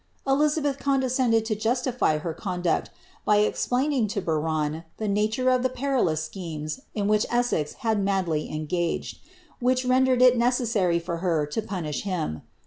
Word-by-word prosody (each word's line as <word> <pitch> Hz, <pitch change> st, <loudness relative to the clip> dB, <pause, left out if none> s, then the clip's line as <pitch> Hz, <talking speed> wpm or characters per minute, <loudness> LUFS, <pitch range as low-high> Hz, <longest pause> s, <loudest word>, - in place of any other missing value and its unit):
Eli 275 Hz, +3 st, +4 dB
zabeth 290 Hz, -2 st, -1 dB
condescended 255 Hz, -4 st, +2 dB
to 220 Hz, -, 0 dB
justify 235 Hz, -, 0 dB
her 160 Hz, +2 st, -4 dB
conduct, 180 Hz, -2 st, -1 dB, 0.3 s
by 210 Hz, -, +3 dB
explaining 250 Hz, +4 st, +1 dB
to 205 Hz, 0 st, -2 dB
Biron 155 Hz, -2 st, -1 dB
the 220 Hz, -, -3 dB
aatore 220 Hz, +5 st, +2 dB
of 250 Hz, -, 0 dB
the 255 Hz, -, +1 dB
perilous 245 Hz, -, 0 dB
schemes 155 Hz, -3 st, -5 dB, 0.2 s
in 205 Hz, -2 st, 0 dB
which 210 Hz, +1 st, +2 dB
Essex 240 Hz, -11 st, 0 dB
had 220 Hz, -3 st, +2 dB
madly 185 Hz, -6 st, 0 dB
engaged, 160 Hz, +3 st, -2 dB, 0.4 s
which 255 Hz, +1 st, +1 dB
rendered 255 Hz, 0 st, +4 dB
it 250 Hz, -1 st, +6 dB
necessary 230 Hz, -8 st, +2 dB
for 170 Hz, 0 st, -3 dB
her 165 Hz, -4 st, 0 dB
to 150 Hz, +9 st, -3 dB
punish 175 Hz, -8 st, -4 dB
him. 170 Hz, -, -3 dB
210 Hz, 150 wpm, -25 LUFS, 165-250 Hz, 0.4 s, it